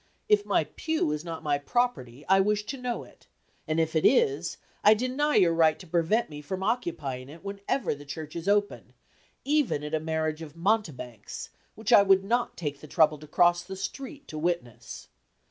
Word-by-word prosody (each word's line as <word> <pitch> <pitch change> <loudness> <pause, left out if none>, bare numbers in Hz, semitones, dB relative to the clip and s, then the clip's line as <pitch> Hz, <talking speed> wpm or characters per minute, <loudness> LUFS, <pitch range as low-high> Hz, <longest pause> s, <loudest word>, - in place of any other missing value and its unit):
If 420 -1 +3
my - - +3
pew 320 - -2
is 150 +1 -3
not 165 -2 -6
my 145 -2 +1
property, 145 - -1
I 190 +1 +5
wish 210 +1 +1
to 275 - -5
know 245 -1 -3
it; - - -19 0.4
and 155 +1 0
if 160 0 0
it 160 - +2
is, 435 -4 +3 0.3
I 210 +1 +7
deny 260 +6 0
your 175 -5 +5
right 160 -2 +4
to 180 - -12
prevent 175 +8 +1
me 150 -1 -9
from 190 +5 -4
occupying 140 - -2
it 160 +4 -12
whenever 200 +7 -2
the 145 0 -10
church 150 +2 -7
is 170 +2 -5
open, 205 0 0 0.5
even 285 - +1
at 150 +1 -6
a 155 - +2
marriage 160 0 -2
of 155 -1 -9
mountebanks, 165 - -2 0.2
which 220 +3 0
I 205 - +9
would 195 -1 +4
not 240 +4 0
take 145 -4 -4
the 155 - -10
trouble 155 -1 +3
to 155 - -12
cross 175 +3 +3
the 190 +2 -8
street 275 +9 -7
to 155 - -5
witness. 170 -8 -3
175 Hz, 195 wpm, -28 LUFS, 155-220 Hz, 0.5 s, I